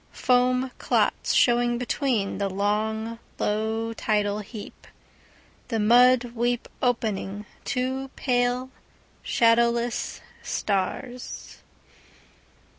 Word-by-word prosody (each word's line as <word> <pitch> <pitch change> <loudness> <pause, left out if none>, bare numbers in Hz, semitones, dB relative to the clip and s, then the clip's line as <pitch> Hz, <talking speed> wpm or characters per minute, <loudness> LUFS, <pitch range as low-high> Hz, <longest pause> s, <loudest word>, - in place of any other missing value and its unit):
Foam 255 +1 +2
clots - - +1
showing 240 0 +3
betweenThe 235 -6 -1
long, 220 +3 -1 0.2
low 220 +2 -1
tidal 210 -2 0
heap, 210 0 -10 0.8
The 230 - -1
mud 245 +2 +5
weed 240 0 0 0.2
opening 210 -4 -1 0.2
two 260 +1 -2
pale, 250 0 0 0.5
shadowless 235 0 +2 0.2
stars. 215 +5 -3
235 Hz, 75 wpm, -25 LUFS, 215-250 Hz, 0.8 s, mud